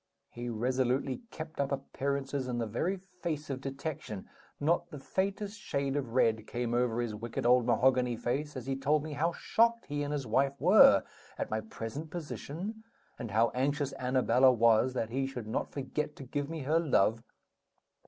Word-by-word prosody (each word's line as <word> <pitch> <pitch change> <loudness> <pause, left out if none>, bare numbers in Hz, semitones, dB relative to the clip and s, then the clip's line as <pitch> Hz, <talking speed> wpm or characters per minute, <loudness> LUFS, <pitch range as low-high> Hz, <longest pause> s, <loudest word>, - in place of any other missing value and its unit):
He 120 0 -5
resolutely 130 +3 0
kept 155 -1 -8
up 140 0 0
appearances 140 0 -2
in 125 -1 -2
the 115 - 0
very 160 - -1
face 170 -5 -5
of 130 -1 -4
detection; 135 -6 -5 0.3
not 170 +3 +1
the 150 - -8
faintest 200 +7 -2
shade 140 -8 -2
of 130 -5 -2
red 110 -3 +2
came 120 -1 -2
over 120 -1 +1
his 120 -3 -2
wicked 115 +4 -4
old 125 0 +5
mahogany 125 -1 +3
face 140 +5 -2
as 125 - -6
he 135 0 -1
told 145 +2 +1
me 155 -1 -5
how 165 +4 +1
shocked 230 +5 +2
he 145 0 -3
and 145 0 -2
his 145 -3 -2
wife 135 +5 +1
were 170 - +7 0.3
at - - -3
my 110 0 0
present 115 +8 -6
position, 175 +5 -6 0.4
and 115 - -4
how 115 +3 +3
anxious 140 +2 0
Annabella 130 0 +4
was 115 +1 +4
that 115 -2 -2
he 135 +2 0
should 125 -4 -6
not 110 - -2
forget 150 +2 -3
to - - -9
give 140 +3 -3
me 165 -1 -4
her 155 +5 +3
love. 115 -8 +2
135 Hz, 180 wpm, -31 LUFS, 120-150 Hz, 0.4 s, were